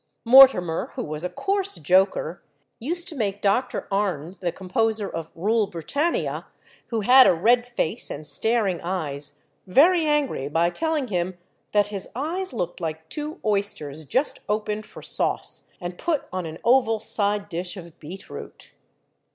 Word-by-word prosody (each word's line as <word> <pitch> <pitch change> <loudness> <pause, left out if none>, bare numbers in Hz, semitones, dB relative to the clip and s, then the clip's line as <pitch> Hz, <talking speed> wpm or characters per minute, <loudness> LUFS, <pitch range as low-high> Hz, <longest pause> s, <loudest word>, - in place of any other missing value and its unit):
Mortimer, 230 -10 +6
who - - -3
was 155 +1 -5
a 180 - -2
coarse 395 - -1
joker, 185 -2 +2 0.4
used 340 +8 -3
to 335 - -5
make 205 -5 -2
Dr. 205 +6 0
Arne, 185 -5 -1
the 175 -2 -1
composer 215 +3 -1
of 165 -3 -6
"Rule 215 +4 +1
Britannia," 285 - -2 0.4
who 225 -2 -2
had 255 +5 +7
a - - +4
red 240 +8 +3
face 240 -3 -2
and 150 +1 -7
staring 215 -2 0
eyes, 150 -6 -4 0.3
very 320 - +5
angry 290 - 0
by 170 +3 +2
telling 310 - -1
him 180 -1 -2 0.3
that 205 -1 +3
his 195 -2 -4
eyes 335 +8 -1
looked 180 -7 -4
like 160 -1 -5
two 305 +3 -5
oysters 195 -8 0
just 260 - +1
opened 210 0 -2
for - - -12
sauce, - - 0
and 175 -1 -6
put 325 -5 -1
on 185 -2 -3
an 160 0 -7
oval 235 -2 +3
side 205 -1 0
dish 180 +1 -4
of 170 -3 -11
beetroot. 180 +6 -10
205 Hz, 150 wpm, -24 LUFS, 175-250 Hz, 0.4 s, had